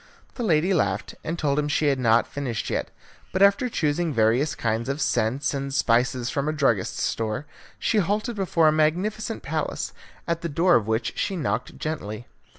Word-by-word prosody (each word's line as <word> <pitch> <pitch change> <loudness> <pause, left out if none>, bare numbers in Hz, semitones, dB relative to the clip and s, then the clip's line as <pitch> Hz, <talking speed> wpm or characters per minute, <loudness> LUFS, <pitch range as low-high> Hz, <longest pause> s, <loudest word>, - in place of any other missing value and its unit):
The - - -6
lady 180 -3 +2
laughed, 100 - 0
and 165 +2 -3
told 145 -3 +1
him 150 - 0
she 150 +1 +1
had 135 -2 +1
not 115 -1 +4
finished 130 -6 -4
yet, - - -1 0.4
but 190 +1 +3
after 200 +5 +4
choosing 160 -3 0
various 120 +4 +2
kinds 115 +2 -1
of 140 +2 -2
scents 135 +2 0
and 140 0 -3
spices 125 -1 +2
from 140 +1 -1
a - - +1
druggist's 135 -10 0
store, 110 +5 -2 0.3
she 220 - +1
halted 210 +5 0
before 175 -5 +2
a - - +6
magnificent 190 +9 0
palace, - - -3 0.3
at 170 -1 -1
the 170 - -3
door 170 +4 +3
of 110 -7 +3
which 110 +1 0
she 195 - -1
knocked 155 - -2
gently. 120 -8 -4
150 Hz, 180 wpm, -25 LUFS, 120-170 Hz, 0.4 s, a